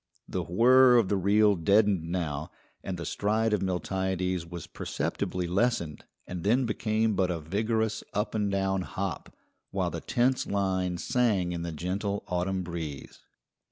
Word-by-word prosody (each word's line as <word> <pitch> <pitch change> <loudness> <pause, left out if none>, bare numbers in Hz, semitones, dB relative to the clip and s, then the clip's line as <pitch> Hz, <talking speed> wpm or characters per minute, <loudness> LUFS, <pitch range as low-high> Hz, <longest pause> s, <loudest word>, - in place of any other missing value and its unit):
The - - -2
whir 125 +7 +6
of 110 -5 +3
the 100 - +2
reel 100 +2 +4
deadened 95 -1 +2
now, 80 -5 -2 0.3
and 95 -2 -4
the 85 - -5
stride 110 +2 0
of 105 - +1
Miltiades 95 -1 -1
was 85 -2 -7
perceptibly 90 -1 -3
lessened 90 -4 0 0.2
and 90 -2 -6
then 120 +6 +3
became 110 0 0
but 95 -1 +1
a 85 -2 -1
vigorous 110 +7 -1
up 105 +1 -1
and 105 -2 0
down 95 -1 0
hop, 95 0 -4 0.4
while - - -1
the - - -5
tense 125 +2 +1
line 95 -3 0
sang 110 -5 +1
in 85 -1 -3
the 85 0 -4
gentle 95 +6 -3
autumn 90 +1 -1
breeze. 80 -5 -6
95 Hz, 155 wpm, -28 LUFS, 90-110 Hz, 0.4 s, whir